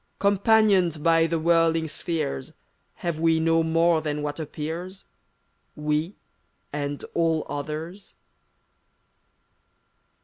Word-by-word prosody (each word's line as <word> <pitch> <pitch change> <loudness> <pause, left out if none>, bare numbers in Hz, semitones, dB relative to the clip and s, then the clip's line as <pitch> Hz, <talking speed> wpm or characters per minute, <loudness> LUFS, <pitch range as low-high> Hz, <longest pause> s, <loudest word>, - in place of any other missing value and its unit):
Companioned 200 -5 +3
by 165 -1 +4
the 165 0 -1
whirling 165 0 +2
spheres, 155 - -4 0.5
Have 170 -2 -1
we 165 0 +3
no 165 0 +3
more 165 0 +2
than 150 -1 -3
what 145 +1 -4
appears 165 +5 -6 0.4
— - - -45
We, 150 +4 -1 0.6
and 145 -1 -3
all 165 -2 +1
others? 155 +7 -6
165 Hz, 100 wpm, -25 LUFS, 150-170 Hz, 0.6 s, by